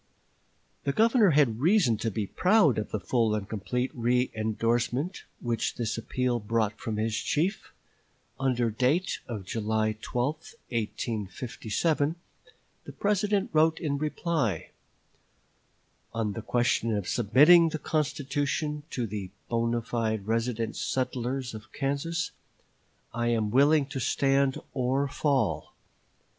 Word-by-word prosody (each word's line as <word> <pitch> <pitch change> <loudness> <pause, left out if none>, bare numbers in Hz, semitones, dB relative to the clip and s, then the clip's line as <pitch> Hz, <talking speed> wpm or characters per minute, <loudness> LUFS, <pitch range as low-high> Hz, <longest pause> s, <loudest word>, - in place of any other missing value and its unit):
" - - -41
The 140 - +1
Governor 225 - +5
had 140 -8 +3
reason 165 - +4
to 115 - -1
be 105 0 -2
proud 180 - +3
of 105 - -4
the 110 - -2
full 115 0 +1
and 100 -2 -4
complete 110 +5 -3
reëndorsement 120 - 0 0.2
which 115 -2 -1
this 110 -3 -2
appeal 125 +1 -1
brought 110 0 -1
from 110 -2 -3
his 110 0 0
chief. 175 - -1 0.7
Under 125 -4 +1
date 135 - +1
of 105 -6 -5
July 110 +1 0
12, 140 +6 -3 0.2
1857, 115 - -1 0.7
the - - -8
President 205 0 0
wrote 160 +1 +4
in 140 -3 -1
reply: 155 - -1 1.4
"On 110 -3 -1
the 115 - -5
question 115 -1 +1
of 100 -3 -4
submitting 150 - +6
the 155 - -3
constitution 150 0 -1
to 125 - -2
the 100 -3 -5 0.2
bonâ 115 0 0
fide 110 -4 -1
resident 115 0 -1
settlers 130 0 -2
of 110 0 -10
Kansas 150 +4 -2 0.8
I 120 +1 -1
am 110 -3 +1
willing 140 +4 +5
to 135 - -4
stand 135 +1 +2 0.2
or 135 +2 +1
fall. 140 0 0
125 Hz, 125 wpm, -28 LUFS, 110-145 Hz, 1.4 s, submitting